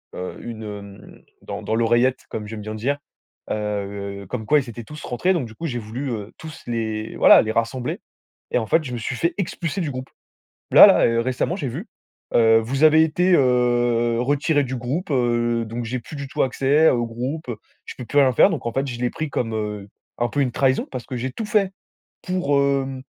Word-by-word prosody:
heu, 90 0 -6
une 115 -2 -7
hem 100 -1 -10 0.2
dans - - -6
dans 110 - -2
l'oreillette 120 +3 +2
comme 105 - -5
j'aime 110 0 -7
bien 110 +1 -6
dire, 135 +7 -1 0.5
heu, 100 -2 -4
comme 110 -3 -4
quoi, 150 +7 +4
ils 130 -3 -6
étaient 120 0 -8
tous 150 +7 -10
rentrés. 180 +10 0
Donc 155 -9 -2
du 110 - -14
coup, 165 - -6
j'ai 120 -6 -2
voulu 120 +5 -5
heu, 105 -3 -5
tous 160 0 -10
les 110 -2 -3
voilà, - - +7
les 110 - -2
rassembler. 115 +3 -2 0.5
Et - - +3
en 115 - -2
fait, 160 +8 +3
je 130 -5 -6
me - - -3
suis 120 +2 -3
fait 170 +5 0
expulser 180 -1 -3
du 155 - -2
groupe. 130 0 -6 0.6
Là - - +10
là - - +5
heu, 115 0 +1
récemment, 130 +8 -1
j'ai 160 -8 -4
vu, 160 - -6 0.5
heu, 115 -1 +6
vous 135 +6 0
avez 155 0 +7
été, 175 +4 +2
heu, 120 -3 +2
retiré 145 +3 +1
du 130 0 -4
groupe, 135 +9 -3
heu, 120 -3 +1
donc 115 +2 -5
j'ai 125 +3 -3
plus 120 - -11
du 140 -1 -6
tout - - -1
accès 140 +4 +3
au 120 -1 +1
groupe, 125 +7 -5
heu, 120 - -3 0.3
je - - -7
peux 125 - -6
plus 145 - 0
rien 135 -2 +5
faire. 125 - +6
Donc 160 -9 -4
en 115 - -1
fait 135 +3 -1
je 120 -3 -6
l'ai 125 -1 0
pris 155 -1 -4
comme, 115 -4 -2
heu, 105 -2 -4 0.3
un 120 - +1
peu 145 - -1
une 130 -3 +1
trahison 130 0 +1
parce 130 -2 -5
que 130 - -5
j'ai 125 +2 -3
tout 220 - -5
fait 205 -3 +1 0.5
pour 180 -6 +1
hem 135 -1 0
125 Hz, 225 wpm, -22 LUFS, 115-140 Hz, 0.6 s, Là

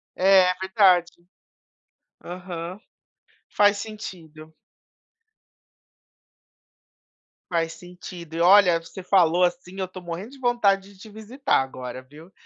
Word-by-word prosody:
É 185 -1 +5
verdade. 190 -3 +3 1.1
Aham. 180 +1 -7 0.7
Faz 205 0 +3
sentido. 160 -8 -10 2.9
Faz 165 -2 -1
sentido 175 -2 -11
e 170 - -2
olha 180 -2 +6
você 180 +3 -11
falou 180 -2 +3
assim 180 +2 -2
eu 190 - -2
tô 185 0 -11
morrendo 175 +7 -7
de 275 - -15
vontade 200 -5 +1
de 190 - -22
te 220 - -12
visitar 220 - -1
agora 130 -1 -7
viu? 150 +7 -16
180 Hz, 105 wpm, -24 LUFS, 170-200 Hz, 2.9 s, olha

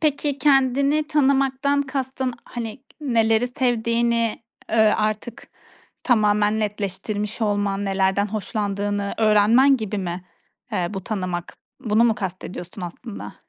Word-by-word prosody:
Peki, 290 -2 0
kendini 280 +2 +3
tanımaktan 280 -1 +2
kastın, 265 -2 -3
hani, 235 +1 -6 0.2
neleri 230 -4 +2
sevdiğini, 235 -2 0 0.3
ııı, 220 -1 +5
artık 215 +2 -3 0.5
tamamen 210 -2 +2
netleştirmiş 210 +1 -3
olman, 205 -1 0
nelerden 195 +1 +1
hoşlandığını 205 -1 -2
öğrenmen 225 +5 +5
gibi 215 -3 -3
mi, 180 -1 -4 0.5
eee, 180 - 0
bu 195 -3 -6
tanımak? 185 -4 -4 0.2
Bunu 225 -2 +3
mu 230 -2 +3
kastediyorsun 185 0 -6
aslında? 200 +6 -8
220 Hz, 105 wpm, -23 LUFS, 205-260 Hz, 0.5 s, ııı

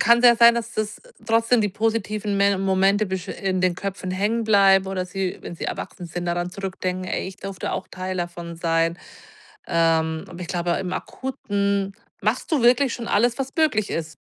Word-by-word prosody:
kann's 235 -1 +5
ja 240 - +8
sein, 235 0 +7
dass 235 0 -3
das 215 -1 -3 0.3
trotzdem 230 +1 +3
die 210 - +1
positiven 215 -1 -1
Me 200 -1 +3
Momente 195 +2 +2
besch 190 0 -4
in 190 -1 -2
den 180 -1 +2
Köpfen 195 -1 -4
hängen 205 +5 0
bleiben 195 -2 +5
oder 185 -1 -2
sie, 185 0 -3
wenn - - -7
sie - - -5
erwachsen 175 - -5
sind, 175 +1 -5
daran 175 +1 -1
zurückdenken: 185 -1 -4
„Ey, 185 - -2
ich 190 - -11
durfte 195 -1 -5
auch - - -3
Teil 185 0 -5
davon 175 -1 -5
sein.“ 165 0 +1 0.7
Ähm, 160 -1 +2
aber 175 - -10
ich 175 - -6
glaube, 175 -1 -1
im 185 -1 -4
Akuten 200 -4 -2 0.3
machst - - 0
du 290 - +3
wirklich 245 +2 +4
schon 235 - -6
alles, 240 +4 +2
was 270 0 -2
möglich 300 -11 +2
ist, 160 -2 -4
195 Hz, 190 wpm, -23 LUFS, 180-215 Hz, 0.7 s, ja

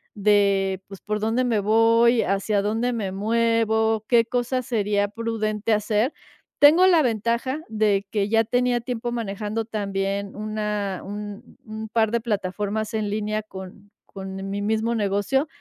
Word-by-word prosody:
de, 200 -2 +2
pues, 195 -1 -10
¿por 210 0 -2
dónde 225 +4 +1
me 230 -4 +1
voy, 230 +3 +4
hacia 200 +1 0
dónde 225 +4 0
me 200 -5 -3
muevo, 220 +1 +1
qué 235 -2 +5
cosa 245 +2 -1
sería 205 -4 0
prudente 215 0 -2
hacer? 215 +5 +1 0.5
Tengo 320 +6 +7
la 340 -4 +5
ventaja 235 +5 -1
de 210 -2 +1
que 205 -2 0
ya 225 +1 +3
tenía 245 +1 +1
tiempo 240 0 -4
manejando, 215 -1 -3
también, 200 -2 -3
una 210 -2 -3
un 205 +2 -8
un 220 -2 -7
par 220 -1 +1
de 235 - +1
plataformas 210 0 -2
en 215 -1 -1
línea 215 0 -1
con 195 0 -11 0.2
con 195 0 -7
mi 200 +1 -3
mismo 220 +2 0
negocio 205 +7 0
215 Hz, 145 wpm, -24 LUFS, 205-230 Hz, 0.5 s, Tengo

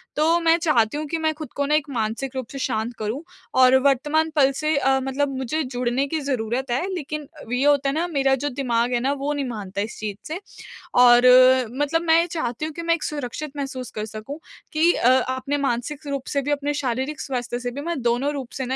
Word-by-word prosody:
तो 325 +3 +3
मैं 330 0 +4
चाहती 290 -7 +2
हूँ 305 - -3
कि 330 +3 -2
मैं 315 -1 0
खुद 310 0 -9
को 285 - 0
ना 300 +2 +2
एक 305 -1 0
मानसिक 245 +2 -3
रूप 260 -3 -4
से 275 - -6
शांत 235 -2 -2
करूँ 220 +6 -3 0.4
और 255 0 +7
वर्तमान 295 +4 +2
पल 275 -2 +5
से 305 +3 -1
अ, 270 -1 +2
मतलब 270 +1 -1
मुझे 265 +5 -2
जुड़ने 250 +1 -1
की 315 +3 -2
ज़रूरत 255 -1 -2
है 265 +10 0
लेकिन 305 -3 -5
अ, - - -10
ये 250 +2 +1
होता 285 -1 +3
है 275 - -1
ना, 335 +3 0
मेरा 275 -5 +2
जो 290 +3 -2
दिमाग 245 -2 0
है 240 - +2
ना, 265 +3 0
वो 285 +1 -2
नहीं 285 -2 -2
मानता 200 -3 -4
इस 215 - -5
चीज़ 210 -2 -4
से 320 +4 -4 0.6
और 240 0 +7
अ, 255 0 +7 0.2
मतलब 325 +3 +1
मैं 335 0 +4
चाहती 305 -5 -3
हूँ 315 - -5
कि 335 - -6
मैं 335 0 +2
एक 330 - -7
सुरक्षित 295 +1 -5
महसूस 265 -3 -5
कर 215 0 -4
सकूँ 220 +8 -8 0.3
कि 325 +3 +4
अ, 240 - +3
अपने 260 +3 -2
मानसिक 280 +5 -3
रूप 275 -2 -3
से 280 - +2
भी 285 +2 -2
अपने 290 0 0
शारीरिक 260 +4 -2
स्वास्थ्य 245 -2 -3
से 245 0 -4
भी 280 +4 -6
मैं 335 -3 -3
दोनों 245 +5 +1
रूप 265 -4 -5
से 265 - -2
ना 260 +1 -2
275 Hz, 235 wpm, -23 LUFS, 245-300 Hz, 0.6 s, और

